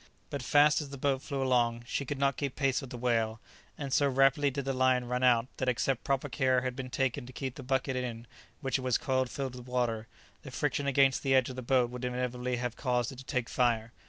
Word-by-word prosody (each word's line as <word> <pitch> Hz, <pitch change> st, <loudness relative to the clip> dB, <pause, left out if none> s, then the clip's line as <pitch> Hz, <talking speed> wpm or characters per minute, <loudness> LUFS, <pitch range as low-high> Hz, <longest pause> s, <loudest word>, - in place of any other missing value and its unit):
But 140 Hz, -, -3 dB
fast 150 Hz, +4 st, +4 dB
as 145 Hz, -, -7 dB
the 140 Hz, -, -7 dB
boat 135 Hz, 0 st, 0 dB
flew 140 Hz, -2 st, -3 dB
along, 120 Hz, -2 st, +2 dB
she 140 Hz, -, -2 dB
could 145 Hz, +2 st, -3 dB
not 140 Hz, -1 st, +2 dB
keep 140 Hz, -3 st, -3 dB
pace 135 Hz, -2 st, +1 dB
with 135 Hz, -, -8 dB
the 125 Hz, -, -7 dB
whale, 115 Hz, -2 st, 0 dB, 0.4 s
and 140 Hz, -2 st, -4 dB
so 140 Hz, -1 st, +4 dB
rapidly 135 Hz, +2 st, +4 dB
did 140 Hz, 0 st, -4 dB
the 135 Hz, -, 0 dB
line 130 Hz, -1 st, +3 dB
run 125 Hz, +1 st, -2 dB
out 120 Hz, -2 st, +4 dB
that 130 Hz, -, 0 dB
except 125 Hz, +1 st, 0 dB
proper 135 Hz, +1 st, 0 dB
care 130 Hz, -2 st, +2 dB
had 130 Hz, -1 st, -3 dB
been 130 Hz, -1 st, -5 dB
taken 135 Hz, 0 st, -1 dB
to -, -, -9 dB
keep 130 Hz, 0 st, -4 dB
the 135 Hz, -, -9 dB
bucket 130 Hz, +1 st, -1 dB
in 120 Hz, -2 st, -4 dB, 0.4 s
which 135 Hz, -2 st, 0 dB
it -, -, -5 dB
was 130 Hz, -2 st, +2 dB
coiled 130 Hz, -1 st, 0 dB
filled 135 Hz, -1 st, -4 dB
with 125 Hz, 0 st, -10 dB
water, 120 Hz, -3 st, -1 dB, 0.3 s
the 135 Hz, -, -9 dB
friction 145 Hz, +1 st, -1 dB
against 135 Hz, -1 st, +3 dB
the 135 Hz, -1 st, +2 dB
edge 130 Hz, 0 st, +3 dB
of -, -, -8 dB
the 130 Hz, -, -5 dB
boat 125 Hz, -1 st, +2 dB
would 125 Hz, 0 st, -7 dB
inevitably 125 Hz, 0 st, -2 dB
have 120 Hz, -1 st, -3 dB
caused 125 Hz, -2 st, 0 dB
it 130 Hz, -, -10 dB
to 135 Hz, -, -10 dB
take 125 Hz, -4 st, -1 dB
fire. 115 Hz, -2 st, +1 dB
130 Hz, 245 wpm, -30 LUFS, 125-135 Hz, 0.4 s, fast